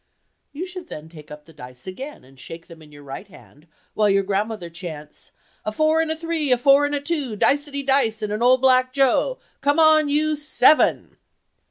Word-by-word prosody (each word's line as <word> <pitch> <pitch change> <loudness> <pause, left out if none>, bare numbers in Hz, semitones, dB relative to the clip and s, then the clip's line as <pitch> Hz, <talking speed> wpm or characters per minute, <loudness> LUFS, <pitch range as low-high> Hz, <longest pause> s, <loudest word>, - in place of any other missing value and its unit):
You 305 +6 -6
should 365 -1 -9
then 155 +1 -9
take 155 -3 -14
up 150 0 -11
the 165 - -18
dice 125 -3 -12
again 265 - -8
and 135 +1 -20
shake 165 +5 -10
them 165 -1 -15
in 150 -1 -16
your 145 0 -14
right 140 +8 -9
hand 155 -4 -19 0.3
while 210 -1 +2
your 195 0 +2
grandmother 205 -1 -3
chants, 165 -3 -10 0.3
"A 215 - -3
four 310 +6 +2
and 325 - -2
a 315 - -1
three—a 320 -5 0
four 280 +3 +4
and 290 - -3
a - - -1
two—dicety 280 -1 -1
dice, 240 -5 +1
and 210 0 -3
an 215 - -4
old 255 +1 +4
black 255 -1 +3
joe—come 285 - 0
on, 310 -2 +5
you 305 +1 +1
SEVEN!" 300 0 +2
255 Hz, 190 wpm, -22 LUFS, -, 0.3 s, on